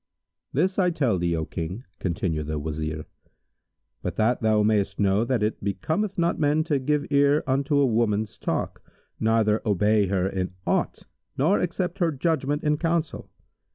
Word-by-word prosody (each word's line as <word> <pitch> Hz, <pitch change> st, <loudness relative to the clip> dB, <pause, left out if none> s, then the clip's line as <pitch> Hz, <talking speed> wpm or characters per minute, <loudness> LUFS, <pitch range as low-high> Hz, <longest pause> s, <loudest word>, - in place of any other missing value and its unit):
"This 185 Hz, +8 st, +1 dB
I 180 Hz, -2 st, +4 dB
tell 135 Hz, -, +1 dB
thee, 85 Hz, -1 st, 0 dB
O 80 Hz, -1 st, -2 dB
King," 90 Hz, +10 st, -5 dB, 0.2 s
continued 85 Hz, -4 st, -2 dB
the 75 Hz, 0 st, -2 dB
Wazir, 80 Hz, +1 st, -4 dB, 1.0 s
"But -, -, -4 dB
that 115 Hz, +3 st, +1 dB
thou 110 Hz, -1 st, +3 dB
mayst 105 Hz, -2 st, +1 dB
know 100 Hz, +1 st, +3 dB
that 120 Hz, -2 st, 0 dB
it 105 Hz, -1 st, -2 dB
becometh 160 Hz, -, -1 dB
not 170 Hz, -1 st, +1 dB
men 150 Hz, +1 st, +2 dB
to 150 Hz, -3 st, 0 dB
give 145 Hz, +2 st, 0 dB
ear 145 Hz, +1 st, +4 dB
unto 140 Hz, +2 st, +1 dB
a 140 Hz, -, +4 dB
woman's 110 Hz, -2 st, 0 dB
talk -, -, -2 dB, 0.4 s
neither 110 Hz, -1 st, +2 dB
obey 105 Hz, 0 st, +2 dB
her 95 Hz, -1 st, +1 dB
in 95 Hz, -1 st, -3 dB
aught -, -, -1 dB, 0.3 s
nor 160 Hz, +10 st, +3 dB
accept 180 Hz, +1 st, -2 dB
her 170 Hz, -3 st, +2 dB
judgment 150 Hz, 0 st, -1 dB
in 150 Hz, -1 st, +2 dB
counsel. 165 Hz, 0 st, -2 dB
115 Hz, 160 wpm, -25 LUFS, 95-150 Hz, 1.0 s, I